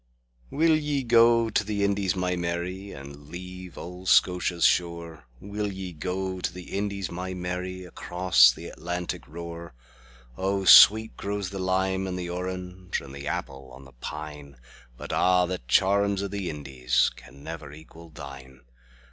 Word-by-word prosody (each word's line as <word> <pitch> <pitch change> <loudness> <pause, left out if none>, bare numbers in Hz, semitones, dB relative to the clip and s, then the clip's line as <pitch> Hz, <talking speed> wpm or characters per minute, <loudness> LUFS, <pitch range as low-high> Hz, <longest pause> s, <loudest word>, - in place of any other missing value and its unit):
WILL 160 +2 +3
ye 150 -3 -1
go 115 -1 +5
to 105 - +2
the 100 -1 -2
Indies, 100 -2 +1
my 90 -1 0
Mary, 90 +3 -3
And 70 +1 -11
leave 90 +1 -9
auld 90 +2 -6
Scotia's 90 -2 +3
shore? 85 -4 0
Will 100 +3 -4
ye 95 -2 -6
go 95 +3 -3
to 90 - -2
the 90 +1 -8
Indies, 100 -2 -2
my 90 +1 -5
Mary, 90 +1 -4
Across 85 -8 +4
th' - - -9
Atlantic 90 -6 -4
roar?O 80 +1 -6
sweet 110 +5 +8
grows 100 -1 -4
the 100 - -5
lime 95 +1 0
and 90 -1 -3
the 90 -1 -4
orange, 90 0 -4
And 70 -1 -11
the 70 +1 -7
apple 70 -6 -4
on 65 +1 -13
the 65 - -15
pine; 75 +1 -8 0.4
But - - -7
a' 90 0 +4
the 90 0 -3
charms 100 +7 +3
o' - - -1
the 100 -2 -4
IndiesCan 65 -5 -1
never 80 -3 -7
equal 80 +2 -13
thine. 70 -4 -11
90 Hz, 150 wpm, -26 LUFS, 75-95 Hz, 0.4 s, sweet